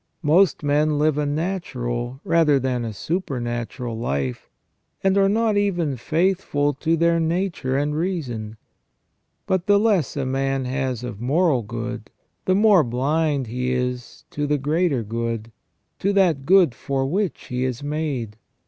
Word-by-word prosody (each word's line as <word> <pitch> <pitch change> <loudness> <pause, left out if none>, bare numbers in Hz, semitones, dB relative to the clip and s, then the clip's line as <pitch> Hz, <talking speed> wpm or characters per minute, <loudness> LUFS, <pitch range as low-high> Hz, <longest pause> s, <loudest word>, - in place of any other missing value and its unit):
Most 160 +3 +3
men 150 +1 +2
Uve 150 -1 +2
a 150 - 0
natural 135 -7 -3
rather 160 -4 +3
than 125 -2 -1
a 115 - -3
supernatural 120 - -3
life, 70 - -3 0.5
and 195 0 +3
are 195 0 +4
not 220 0 +2
even 175 -8 0
faithful 155 - 0
to 165 +4 0
their 170 +1 +3
nature 165 -5 -1
and 145 +1 0
reason. 130 - -3 0.9
But 185 -2 0
the 205 0 +6
less 200 - +1
a 135 - -1
man 135 0 -1
has 130 -2 -2
of 115 -4 -6
moral 145 +1 +2
good, 115 +1 -6 0.4
the 185 - +3
more 205 -4 +5
blind 140 +3 0
he 125 +2 -2
is 125 -1 -3
to 145 0 -2
the 145 0 +2
greater 145 -2 0
good, 115 +1 -3 0.5
to 200 - +1
that 170 -9 +2
good 180 -7 +5
for 135 +2 -2
which 185 +5 -2
he 125 0 -1
is 130 +1 -3
made. 145 -8 -3
145 Hz, 150 wpm, -23 LUFS, 125-170 Hz, 0.9 s, the